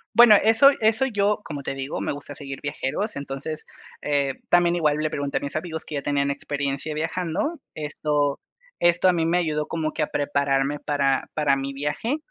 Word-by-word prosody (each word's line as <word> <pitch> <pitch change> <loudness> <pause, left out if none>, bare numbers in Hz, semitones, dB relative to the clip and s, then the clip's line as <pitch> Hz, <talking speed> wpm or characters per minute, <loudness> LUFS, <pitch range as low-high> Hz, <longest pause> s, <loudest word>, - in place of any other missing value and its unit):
Bueno, 235 -3 +9
eso 225 +5 +7
eso 225 +4 +3
yo, 210 -3 +1
como 145 -3 -6
te 135 - -3
digo, 135 +1 -4
me - - -2
gusta 145 0 -7
seguir 135 -2 -7
viajeros. 150 +7 -3
Entonces, 140 +2 -5 0.4
eh, 140 -2 0
también 175 0 +4
igual 150 -3 +2
le 155 0 0
pregunté 140 -1 -2
a - - +1
mis 140 - -5
amigos 160 0 -4
que 150 - -6
ya 140 - -1
tenían 140 -1 0
experiencia 140 +1 -3
viajando. 175 - -2
Esto 150 -1 -1 0.4
esto 175 +1 +4
a 180 - +5
mí 165 -2 0
me 170 +2 +2
ayudó 155 -3 -1
como 160 -2 -2
que 155 - -1
a - - -1
prepararme 140 0 0
para 140 -3 0
para 150 -3 +2
mi 135 0 -4
viaje 150 - -2
150 Hz, 190 wpm, -24 LUFS, 140-175 Hz, 0.4 s, Bueno